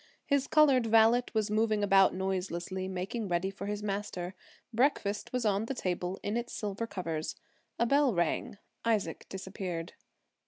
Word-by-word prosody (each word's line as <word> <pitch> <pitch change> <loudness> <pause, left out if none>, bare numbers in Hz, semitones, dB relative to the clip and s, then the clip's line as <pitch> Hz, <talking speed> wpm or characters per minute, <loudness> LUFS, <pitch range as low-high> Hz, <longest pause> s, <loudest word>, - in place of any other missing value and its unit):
His 280 -2 +1
colored 275 -6 +5
valet 225 +2 +5
was 215 -1 +1
moving 215 -1 +2
about 195 -1 +6
noiselessly, 185 0 -2
making 190 +4 -3
ready 180 +2 0
for 195 +1 -7
his 205 0 -3
master. 195 -3 -3 0.4
Breakfast 220 -5 +1
was 250 -2 -1
on 205 +1 +2
the 270 - -3
table 180 -3 -2
in 210 +3 -1
its 240 0 -4
silver 210 +1 -3
covers. 165 -6 -3 0.4
A 235 - +2
bell 280 +1 +4
rang; 170 +4 0 0.3
Isaac 210 -8 0
disappeared. 190 -3 -5
205 Hz, 150 wpm, -31 LUFS, 185-230 Hz, 0.4 s, about